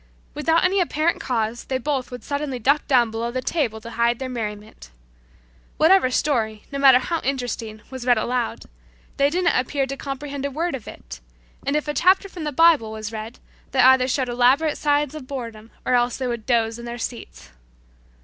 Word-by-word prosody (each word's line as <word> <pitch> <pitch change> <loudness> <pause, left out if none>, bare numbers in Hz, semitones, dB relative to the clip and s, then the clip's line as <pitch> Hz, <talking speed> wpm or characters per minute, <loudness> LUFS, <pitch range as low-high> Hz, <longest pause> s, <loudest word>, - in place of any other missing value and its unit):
Without 325 +2 +2
any 385 +2 +2
apparent 330 -1 0
cause 230 -1 -2
they 260 - -1
both 265 -1 -2
would 250 -2 -8
suddenly 285 -2 -3
duck 280 +5 +1
down 240 -4 +3
below 230 +1 -3
the 255 +2 -3
table 255 -6 -1
to 230 - -9
hide 235 +1 +1
their 260 0 -5
merriment. 210 - -6 0.9
Whatever 335 -3 +5
story, 225 -6 0
no 280 - -3
matter 270 -2 +7
how 325 +6 -2
interesting, 245 -5 -4
was 260 -2 -6
read 245 -1 +4
aloud, 240 +2 -2 0.5
they 280 0 +4
didn't 350 +2 +1
appear 270 +2 0
to 270 +1 -5
comprehend 275 0 -6
a 280 - -1
word 325 +5 -2
of 250 -5 -6
it, - - -10 0.5
and 280 - +1
if 300 0 -1
a 295 - -1
chapter 375 +7 +3
from 350 -5 -7
the 300 - -2
Bible 300 -7 +4
was 215 0 -6
read 220 +2 -7 0.4
they 265 - 0
either 260 0 +6
showed 260 0 0
elaborate 255 +6 +3
signs 295 0 +1
of 300 -5 -8
boredom 230 -5 -7 0.2
or - - +1
else 245 0 +2
they 260 - -3
would 235 -3 -4
doze 230 -2 +1
in 235 - -8
their 240 0 -5
seats. 230 - -7
255 Hz, 195 wpm, -22 LUFS, 235-290 Hz, 0.9 s, matter